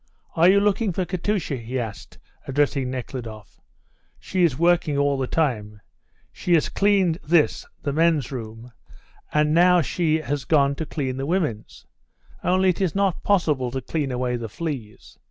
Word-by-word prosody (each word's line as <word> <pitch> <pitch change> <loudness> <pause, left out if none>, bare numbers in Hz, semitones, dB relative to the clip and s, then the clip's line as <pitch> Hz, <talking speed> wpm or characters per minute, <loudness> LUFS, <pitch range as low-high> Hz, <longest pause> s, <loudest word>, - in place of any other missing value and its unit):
"Are 170 +2 +5
you 200 +1 +5
looking 205 +1 +1
for 185 +2 -1
Katusha?" 180 -4 -2
he 120 +2 -5
asked, 110 -4 -7 0.3
addressing 135 -1 0
Nekhludoff. 115 -7 -7 0.6
"She 185 -1 -1
is 150 -7 +2
working 170 -3 +2
all 140 0 +2
the 135 -1 -2
time. 110 -10 -1 0.5
She 175 - +1
has 160 - +1
cleaned 195 -5 +2
this, 160 -1 +2 0.2
the 140 - -1
men's 160 -4 +2
room, 115 -1 -8 0.6
and 150 0 +2
now 180 +1 +5
she 160 +3 0
has 145 -2 -3
gone 140 -1 +3
to 160 - -4
clean 130 -4 -3
the 135 +1 -3
women's! 155 - -2 0.6
Only 185 +1 +3
it 180 - -1
is 185 -3 0
not 195 -3 +1
possible 150 -10 +1
to 130 +2 -3
clean 140 +1 -3
away 125 0 -1
the 115 -2 -6
fleas. 130 -6 -7
150 Hz, 160 wpm, -23 LUFS, 125-175 Hz, 0.6 s, Are